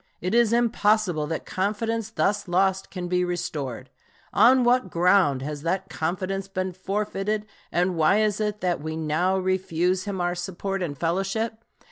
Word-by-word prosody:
It 180 +3 -2
is 235 -2 +4
impossible 215 -8 +2
that 160 +1 -4
confidence 215 +3 -1
thus 205 -2 0
lost 190 +2 +1
can 180 -2 -5
be 180 0 +1
restored. 140 -8 -4 0.4
On 255 +1 +6
what 240 -4 +3
ground 170 -6 +3
has 150 0 -5
that 190 +4 -2
confidence 185 +4 -2
been 185 -1 -3
forfeited, 205 +2 -2 0.3
and 180 +1 +1
why 165 +6 +4
is 215 -1 +1
it 210 0 -2
that 175 -4 0
we 160 +1 -4
now 160 +4 +1
refuse 185 -1 0
him 200 -2 -3
our 175 0 0
support 190 +2 -4
and 150 -6 -3
fellowship? 195 - -1
185 Hz, 155 wpm, -25 LUFS, 175-210 Hz, 0.4 s, On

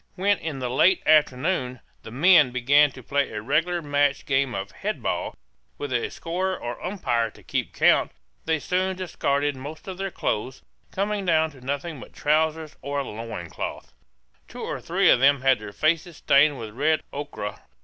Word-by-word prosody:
When 200 +1 +2
in 160 -4 -4
the 125 -2 -3
late 175 +8 +4
afternoon 140 -3 +2 0.2
the - - -10
men 150 +3 +5
began 140 +4 +4
to 130 - -12
play 140 +3 0
a 105 - -5
regular 170 +7 0
match 145 -1 +1
game 135 -2 +1
of 100 +1 -4
head - - -4
ball, - - -2 0.4
with 145 -3 -4
a 120 - 0
scorer 185 +3 -3
or 120 0 -6
umpire 120 - -1
to - - -18
keep - - -2
count, - - +3 0.3
they 160 0 +1
soon 185 +4 -1
discarded 145 -6 -1
most 145 +7 -9
of 190 -1 -6
their 195 0 -2
clothes, 125 - -3 0.3
coming 205 +1 -2
down 160 -3 +2
to 135 -3 -16
nothing 140 +4 -4
but - - -12
trousers 155 +1 0
or 140 +1 -3
a 140 - 0
loin 110 -5 -6
cloth. - - -6 0.5
Two - - -9
or - - -4
three - - +1
of - - +5
them 140 +1 +4
had 135 -2 +3
their 105 -1 -8
faces 160 - 0
stained 140 +1 +4
with 110 -3 -7
red 155 +6 +1
ochre. 140 -8 -5
145 Hz, 180 wpm, -25 LUFS, 130-165 Hz, 0.5 s, men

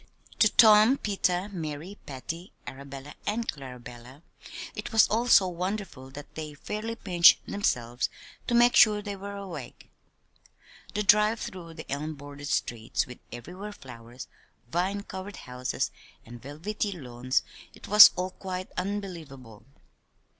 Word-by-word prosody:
To 215 - +6
Tom, 220 +4 +6
Peter, 195 -4 0
Mary, 165 0 -6
Patty, 165 +7 -7
Arabella, 140 +1 -9
and 225 +3 -1
Clarabella, 125 0 -9 0.5
it - - -6
was 225 -1 +6
all 230 +3 0
so 200 -5 +6
wonderful 180 -6 -4
that 145 +2 -11
they 155 -2 -7
fairly 215 +9 -5
pinched 175 -6 +5
themselves 120 -11 -1 0.4
to 240 - +1
make 240 +1 +5
sure 210 -1 +6
they 205 -1 -5
were 200 +1 -7
awake. 175 -10 -9 1.0
The 210 - 0
drive 210 +2 +4
through 170 -3 -8
the 160 - -9
elm 150 +3 -3
bordered 145 0 -9
streets 115 -5 -1
with 125 - -11
everywhere 180 - -8
flowers, 120 - -11 0.4
vine 190 +5 -1
covered 190 0 -8
houses, 125 0 -3 0.3
and 120 +1 -11
velvety 200 +9 -4
lawns 130 -5 -2 0.3
it - - -12
was 210 +1 +11
all 185 +1 -2
quite 185 -1 -6
unbelievable. 160 - -6
175 Hz, 130 wpm, -28 LUFS, 135-205 Hz, 1.0 s, was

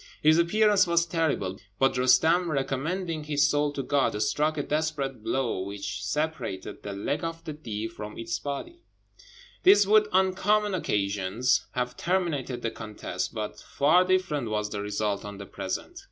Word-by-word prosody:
His 155 +2 +6
appearance 205 +3 +4
was 170 0 +3
terrible; 155 - -1 0.2
but 135 0 +3
Roostem, 160 +8 +4
recommending 155 +4 -2
his 145 -1 +3
soul 145 0 +1
to 135 - -3
God, 135 -7 +1
struck 150 +8 0
a 145 - 0
desperate 145 -6 -2
blow, 125 -4 -1
which 100 +1 -5
separated 150 -11 -3
the 100 - -6
leg 140 +10 -2
of 165 0 -4
the 155 -2 -5
Deev 115 -7 -5
from 105 -1 -8
his 115 0 -3
body. 240 - -6 0.8
This 380 - +7
would 210 +1 +5
on 190 0 +3
common 210 +2 +2
occasions 105 - 0
have 125 0 -2
terminated 155 -9 -1
the 115 - -1
contest, 105 -4 -5
but 105 -1 -4
far 160 +6 +3
different 185 -9 0
was 105 -1 -2
the 105 - -3
result 105 0 -2
on 105 -1 -7
the 100 - -8
present. 225 - -5
145 Hz, 160 wpm, -27 LUFS, 105-170 Hz, 0.8 s, This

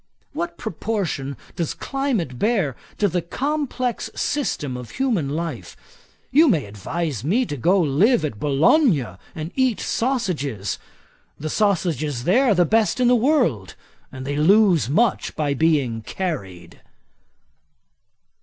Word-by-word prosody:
What 340 +3 -4
proportion 180 - -3 0.2
does 170 -3 -2
climate 235 - -2
bear 195 - +1 0.2
to 205 - +2
the 180 -1 -1
complex 255 - -2
system 150 - -2
of 125 -2 -7
human 230 - 0
life? 165 +3 -5 0.5
You 305 +4 +6
may 160 - +2
advise 120 - -4
me 220 - +2
to 150 - -4
go 175 +7 +2
to 145 - -2
live 195 - +3
at 115 -9 -5
Bologna 150 - +3 0.3
to 160 +2 -5
eat 260 -4 +1
sausages. 170 - -2 0.6
The 155 +1 -4
sausages 160 - 0
there 245 - +3
are 220 -6 +4
the 175 -1 +4
best 220 +6 +2
in 250 -1 +4
the 250 - +5
world; 235 - +1 0.4
they 130 +2 -5
lose 180 - +4
much 220 +9 +1
by 150 -2 0
being 140 -7 +1
carried.' 95 - -5
170 Hz, 130 wpm, -22 LUFS, -, 0.6 s, You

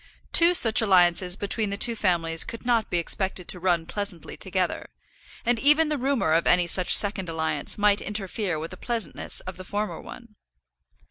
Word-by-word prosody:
Two 345 +1 +4
such 225 -8 +5
alliances 180 -3 +2
between 205 +2 -3
the 200 - -4
two 235 +2 +2
families 165 -5 +1
could 230 +1 -9
not 235 -3 0
be 175 - -1
expected 180 +1 -3
to 180 - -3
run 175 -2 0
pleasantly 200 -2 -5
together, - - -3 0.6
and 235 0 +1
even 300 +4 +3
the 300 - -1
rumour 260 - -1
of 165 +1 +1
any 180 -1 +4
such 180 +1 +1
second 200 -3 +6
alliance 160 -3 -3
might 205 -1 +2
interfere 200 -3 -4
with 160 +2 -7
the - - -10
pleasantness 230 -9 -4
of 185 -1 -9
the 185 - -9
former 205 +3 -5
one. 235 -3 -13
200 Hz, 180 wpm, -24 LUFS, 175-225 Hz, 0.6 s, second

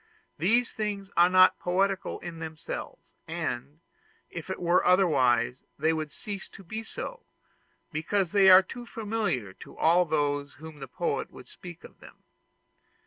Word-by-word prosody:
These 230 +9 +2
things 205 -2 -4
are 175 +1 +6
not 185 0 +5
poetical 190 +2 0
in 170 -2 -7
themselves; 160 -1 -7
and, 140 +6 -4 0.5
if 170 +2 -7
it 190 - -4
were 175 +1 +3
otherwise, 130 -10 +3 0.2
they 160 +3 +2
would 155 -2 -3
cease 200 +3 -7
to 195 - -13
be 220 +6 -6
so, 485 - -7 0.7
because 175 +4 -1
they 200 -2 +6
are 185 +1 +9
too 240 +5 -9
familiar 210 - -2
to - - -12
all 175 +3 +4
those 145 -2 -1
to - - -22
whom 155 -1 -11
the 135 - -7
poet - - -2
would - - -13
speak - - -12
of - - -14
them. - - -16
175 Hz, 155 wpm, -28 LUFS, 155-195 Hz, 0.7 s, are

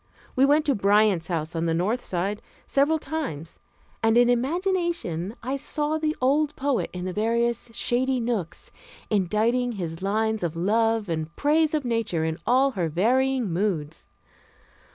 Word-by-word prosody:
We 265 - +5
went 295 +2 +3
to 285 - +3
Bryant's 200 -5 +3
home 165 -4 -1
on 165 0 -1
the 165 - +1
north 210 +9 0
side, 195 +4 -2 0.2
several 290 +3 +2
times, 280 - -5 0.4
and 225 +1 +3
in 245 0 +5
imagination 310 - -1
I 265 +3 -2
saw 300 +2 -1
the 310 0 -1
old 290 +3 +2
poet 280 -2 -1
in 180 0 -6
the 185 - -3
various 235 +3 0
shady 255 +3 0
nooks, 225 -8 -3 0.4
inditing 220 +5 +1
his 170 -5 -5
lines 220 +2 0
of 170 -2 -2
love 220 +4 +1
and 160 -1 -4
praise 310 +1 +2
of 295 -3 -2
nature 230 -9 -1
in 160 +1 -3
all 265 +3 +4
her 180 -8 -2
varying 245 - +1
moods. 165 -5 -2
225 Hz, 155 wpm, -25 LUFS, 180-270 Hz, 0.4 s, We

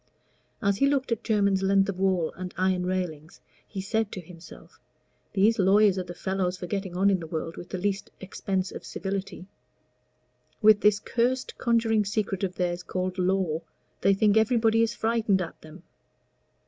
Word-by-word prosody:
As 200 -1 +2
he 275 - +3
looked 275 -3 0
at 230 0 -1
Jermyn's 200 -3 +2
length 195 0 +3
of 190 -2 -4
wall 185 -4 +1
and 180 0 -7
iron 185 -1 +1
railing, 170 -5 -3 0.4
he 195 - -5
said 220 +2 -1
to - - -5
himself, 170 -1 -14 0.5
"These 210 +3 +3
lawyers 195 0 +4
are - - -2
the 175 0 -9
fellows 190 -1 -2
for 180 - -6
getting 190 -1 -4
on 200 +2 +4
in 190 - +1
the 165 - -7
world 165 +1 -4
with 175 - -9
the - - -4
least 195 +1 -2
expense 190 0 -3
of - - -8
civility. 195 -1 -5 1.1
With 215 -2 +6
this 210 -1 +4
cursed 250 +4 -1
conjuring 225 -3 +2
secret 200 -1 -2
of 185 -1 -2
theirs 175 -1 -1
called 185 +1 -3
Law, 180 -3 +1 0.4
they 195 - +4
think 210 +1 +3
everybody 225 0 +3
is 230 0 +1
frightened 225 -3 +1
at 175 -3 -6
them. 155 +3 -13
195 Hz, 175 wpm, -27 LUFS, 180-210 Hz, 1.1 s, With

